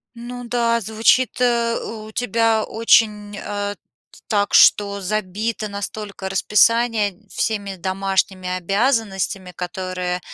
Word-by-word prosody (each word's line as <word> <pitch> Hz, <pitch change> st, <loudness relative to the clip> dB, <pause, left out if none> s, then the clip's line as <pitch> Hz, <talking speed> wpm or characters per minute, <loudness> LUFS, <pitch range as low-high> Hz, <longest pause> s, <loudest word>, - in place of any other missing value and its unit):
Ну 245 Hz, +1 st, -8 dB
да, 235 Hz, -1 st, +1 dB
звучит, 225 Hz, +5 st, +2 dB
э, 235 Hz, -1 st, +2 dB
у 215 Hz, -1 st, -7 dB
тебя 225 Hz, -1 st, +1 dB
очень, 210 Hz, -2 st, +2 dB
а, 205 Hz, 0 st, -4 dB
т -, -, -24 dB
так, 205 Hz, -2 st, +1 dB
что 200 Hz, -1 st, +5 dB
забито 215 Hz, +2 st, -2 dB
настолько 200 Hz, -1 st, -6 dB
расписание 210 Hz, 0 st, +2 dB
всеми 205 Hz, -3 st, -2 dB
домашними 190 Hz, 0 st, -1 dB
обязанностями, 195 Hz, 0 st, -1 dB
которые, 180 Hz, 0 st, -4 dB
210 Hz, 105 wpm, -21 LUFS, 195-230 Hz, -, что